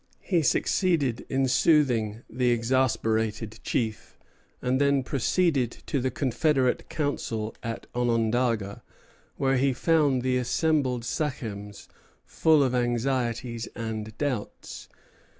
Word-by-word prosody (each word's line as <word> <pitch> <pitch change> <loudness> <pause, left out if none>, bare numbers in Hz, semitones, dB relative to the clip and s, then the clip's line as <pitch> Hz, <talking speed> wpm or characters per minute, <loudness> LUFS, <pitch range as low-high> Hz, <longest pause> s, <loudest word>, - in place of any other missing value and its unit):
He 175 -4 +1
succeeded 150 - +1
in 135 0 +1
soothing 125 -6 +2
the 125 +1 0
exasperated 115 -3 0
chief, 110 -4 -3 0.4
and 130 +2 0
then 140 -1 +3
proceeded 140 0 +1 0.2
to 140 - -1
the 130 - 0
confederate 130 +1 0
council 115 -7 -2
at 115 0 -5
Onondaga, 115 -3 0 0.5
where 135 0 +1
he 135 +1 +2
found 145 -4 +2
the 130 0 +1
assembled 130 -2 0
sachems 110 -9 -4 0.4
full 155 -3 +3
of 130 -2 0
anxieties 120 -1 -1
and 110 -1 -5
doubts. 130 -8 -4
125 Hz, 105 wpm, -26 LUFS, 115-140 Hz, 0.5 s, then